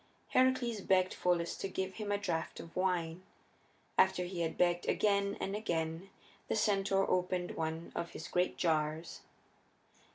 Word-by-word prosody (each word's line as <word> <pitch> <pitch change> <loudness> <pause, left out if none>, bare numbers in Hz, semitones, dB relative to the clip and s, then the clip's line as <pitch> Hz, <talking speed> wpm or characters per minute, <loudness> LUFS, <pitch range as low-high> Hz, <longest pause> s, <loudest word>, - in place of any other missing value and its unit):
Heracles 255 -4 +2
begged 185 -1 +3
Pholus 175 -1 +1
to - - -2
give 190 0 -3
him 210 -2 -3
a 205 - +2
draft 175 -5 -2
of 165 - -10
wine; 180 -2 0 0.8
after 190 -1 +4
he 175 -1 -4
had 165 - -1
begged 175 0 +2
again 200 -1 +2
and 195 - -2
again 165 -3 -2 0.4
the - - 0
centaur 195 -2 +2
opened 180 -1 0
one 160 +1 -3
of 170 - -3
his 160 - -6
great 180 +1 0
jars. 155 -1 0
180 Hz, 150 wpm, -34 LUFS, 170-200 Hz, 0.8 s, after